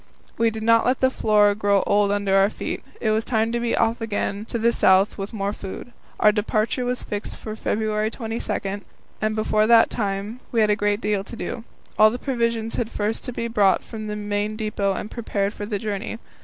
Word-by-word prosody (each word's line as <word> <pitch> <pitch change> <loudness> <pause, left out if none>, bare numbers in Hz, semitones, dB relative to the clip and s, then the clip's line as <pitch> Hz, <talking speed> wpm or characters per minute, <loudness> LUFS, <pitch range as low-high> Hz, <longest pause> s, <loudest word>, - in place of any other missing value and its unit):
We 230 0 +3
did 220 0 -6
not 230 0 +5
let 255 +1 +2
the 260 0 +3
floor 210 -4 +3
grow 200 -1 +2
old 205 0 +3
under 200 -1 +1
our 195 +1 +5
feet; - - -5 0.2
it 220 - +1
was 220 +1 +1
time 225 -1 0
to 235 - 0
be 235 -1 0
off 230 +2 +1
again 210 -1 -2
to 235 - -3
the 235 +1 +3
south 190 -2 +4
with 195 +1 -4
more 200 -2 -2
food. 195 +6 -8 0.3
Our 210 - +6
departure 215 +3 0
was 250 0 -2
fixed 205 0 -5
for 215 -1 -6
February 215 0 -1
22, 220 -4 -4 0.4
and 215 0 0
before 215 0 +2
that 230 -1 +6
time 205 +2 -3
we 230 - +1
had 215 -1 +4
a - - +3
great 205 +1 0
deal 205 -1 0
to 235 - -9
do. 230 0 -5 0.3
All 215 0 +8
the 240 - -4
provisions 235 -4 -1
had 230 -2 -1
first 210 +1 -2
to - - -3
be 235 -1 -3
brought 205 -4 +3
from 215 -2 -7
the 210 - -3
main 205 0 -2
depot 210 -2 -1
and 210 - -5
prepared 205 -3 -2
for 205 - -6
the 210 -2 -1
journey. 210 +2 -4
215 Hz, 215 wpm, -23 LUFS, 205-230 Hz, 0.4 s, All